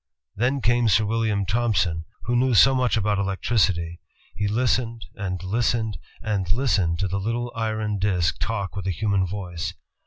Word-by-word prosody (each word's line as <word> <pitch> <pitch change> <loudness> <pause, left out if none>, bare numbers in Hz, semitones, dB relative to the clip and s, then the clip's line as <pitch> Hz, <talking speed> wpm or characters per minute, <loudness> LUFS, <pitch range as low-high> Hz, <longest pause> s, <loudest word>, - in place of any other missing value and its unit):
Then 130 +6 0
came 120 0 +3
Sir 105 +2 +4
William 110 -2 0
Thompson, 90 -6 +1 0.2
who 120 +5 0
knew 125 0 +3
so 135 +5 +7
much 125 -3 +2
about 105 -1 +1
elec 95 -1 -1
tricity; 85 -7 +1 0.3
he 105 - -1
listened, 115 +1 0
and 95 -4 -4
listened, 110 -1 0 0.2
and 100 -5 -1
listened 100 -7 +1
to 95 - +1
that 95 - -3
little 115 +4 -2
iron 110 -2 -1
disk 90 -5 +1
talk 100 -4 -2
with 95 -1 -4
a - - +1
human 95 +1 +1
voice. 90 -3 -5
105 Hz, 165 wpm, -24 LUFS, 95-115 Hz, 0.3 s, so